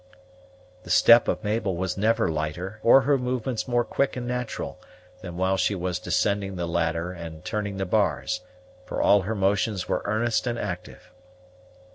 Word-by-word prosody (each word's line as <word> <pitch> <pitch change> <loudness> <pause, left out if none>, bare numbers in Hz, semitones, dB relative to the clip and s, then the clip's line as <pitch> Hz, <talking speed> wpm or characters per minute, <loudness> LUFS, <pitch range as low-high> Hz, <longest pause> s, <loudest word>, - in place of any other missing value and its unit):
The 90 - -14
step 115 +6 +6
of - - -1
Mabel 105 -3 -1
was 95 0 -2
never 110 +2 +2
lighter, 80 +6 -3
or 125 +3 +7
her 140 +1 +2
movements 125 -1 -2
more 120 -1 +2
quick 140 +2 0
and 125 -1 -4
natural, 125 -1 -4 0.4
than 85 -2 -7
while 95 +1 +1
she 95 +2 +1
was 90 -1 -2
descending 95 +2 0
the 90 -1 -2
ladder 85 0 -1
and 80 -3 -9
turning 100 -2 -3
the 95 - -1
bars, 105 +2 0 0.4
for - - -5
all 100 - +5
her 110 +5 -3
motions 100 0 0
were - - 0
earnest 110 +2 0
and 120 -1 -1
active. 90 -5 -6
100 Hz, 165 wpm, -25 LUFS, 90-115 Hz, 0.4 s, or